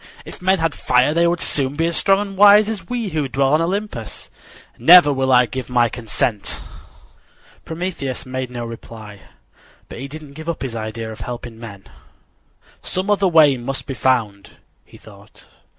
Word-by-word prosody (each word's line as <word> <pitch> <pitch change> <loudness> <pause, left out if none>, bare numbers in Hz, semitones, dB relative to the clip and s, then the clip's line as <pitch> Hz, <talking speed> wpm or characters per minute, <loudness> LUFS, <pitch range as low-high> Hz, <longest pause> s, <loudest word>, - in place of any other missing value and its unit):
"If - - -11
men 190 +1 +2
had 165 -3 -1
fire 125 +3 +2
they 170 +1 +3
would 170 0 -1
soon 140 -1 0
be 165 +2 0
as 170 0 -1
strong 195 0 +3
and 200 -1 -5
wise 205 +1 +7
as 205 -6 -6
we 235 -4 -3
who 155 -4 -2
dwell 135 +1 0
on 155 - +3
Olympus. 180 - -4 0.5
Never 155 +3 +7
will 130 0 0
I 125 -1 +5
give 125 +2 -6
my 120 -2 +2
consent." 110 -1 -3 1.1
Prometheus 160 -6 -5
made 130 -1 -5
no 120 -1 -6
reply, 110 -3 -10 0.7
but - - -9
he 135 - -6
didn't 150 0 -11
give 160 +3 -8
up 165 - -4
his 125 -3 -5
idea 110 0 -5
of 110 - -10
helping 120 -1 -7
men. 100 -4 -10 1.0
"Some 190 +3 -3
other 200 -1 +2
way 155 -6 +5
must 135 +3 -5
be 135 - -5
found," 110 -5 -1 0.3
he - - -17
thought. - - -17
135 Hz, 175 wpm, -19 LUFS, 120-170 Hz, 1.1 s, wise